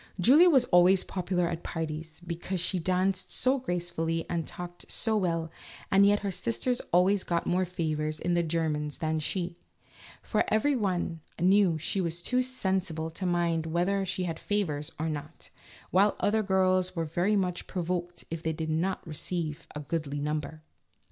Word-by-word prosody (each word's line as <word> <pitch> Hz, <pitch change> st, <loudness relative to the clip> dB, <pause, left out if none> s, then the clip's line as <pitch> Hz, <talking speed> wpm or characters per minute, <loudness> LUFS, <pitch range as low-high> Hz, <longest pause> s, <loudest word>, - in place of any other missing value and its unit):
Julia 295 Hz, -, +7 dB
was 265 Hz, -6 st, +5 dB
always 180 Hz, 0 st, +5 dB
popular 180 Hz, -1 st, -1 dB
at 170 Hz, 0 st, -3 dB
parties 160 Hz, 0 st, -5 dB
because 175 Hz, +2 st, -3 dB
she 180 Hz, +1 st, +1 dB
danced 185 Hz, +2 st, 0 dB
so 265 Hz, +2 st, +2 dB
gracefully 170 Hz, -5 st, -2 dB
and 170 Hz, -2 st, -2 dB
talked 175 Hz, 0 st, -8 dB
so 225 Hz, -1 st, +1 dB
well, 165 Hz, -5 st, 0 dB, 0.4 s
and 195 Hz, +1 st, +6 dB
yet 205 Hz, 0 st, +3 dB
her 200 Hz, -1 st, -2 dB
sisters 230 Hz, +6 st, -1 dB
usually 185 Hz, +4 st, +5 dB
got 170 Hz, -3 st, -2 dB
more 185 Hz, +1 st, +1 dB
favors 155 Hz, -3 st, -2 dB
in 175 Hz, -, 0 dB
the 175 Hz, -, +3 dB
German 155 Hz, -2 st, -1 dB
than 160 Hz, 0 st, 0 dB
she, 175 Hz, +2 st, -3 dB, 0.6 s
for -, -, +1 dB
everybody 210 Hz, -, +1 dB, 0.2 s
knew 185 Hz, -1 st, +4 dB
she 190 Hz, +5 st, -1 dB
was 170 Hz, 0 st, -3 dB
too 250 Hz, 0 st, +2 dB
sensible 190 Hz, -10 st, -2 dB
to 185 Hz, +3 st, -4 dB
mind 170 Hz, -2 st, +1 dB
whether 180 Hz, +4 st, +1 dB
she 185 Hz, 0 st, -2 dB
had 165 Hz, -2 st, -3 dB
favors 165 Hz, -7 st, -1 dB
or 160 Hz, -, -1 dB
not, 150 Hz, 0 st, -6 dB, 0.4 s
while 200 Hz, +3 st, +4 dB
other 220 Hz, +1 st, +2 dB
girls 185 Hz, -2 st, +2 dB
were 165 Hz, -1 st, -1 dB
very 175 Hz, +7 st, +1 dB
much 180 Hz, -3 st, -1 dB
provoked 175 Hz, -1 st, -3 dB
if 165 Hz, -1 st, -4 dB
they 160 Hz, -1 st, -1 dB
did 160 Hz, 0 st, -3 dB
not 175 Hz, +4 st, -1 dB
re 160 Hz, -, -6 dB
ceive 165 Hz, 0 st, -3 dB
a -, -, -3 dB
goodly 145 Hz, -1 st, -3 dB
number. 150 Hz, +1 st, -3 dB
175 Hz, 170 wpm, -29 LUFS, 160-190 Hz, 0.6 s, Julia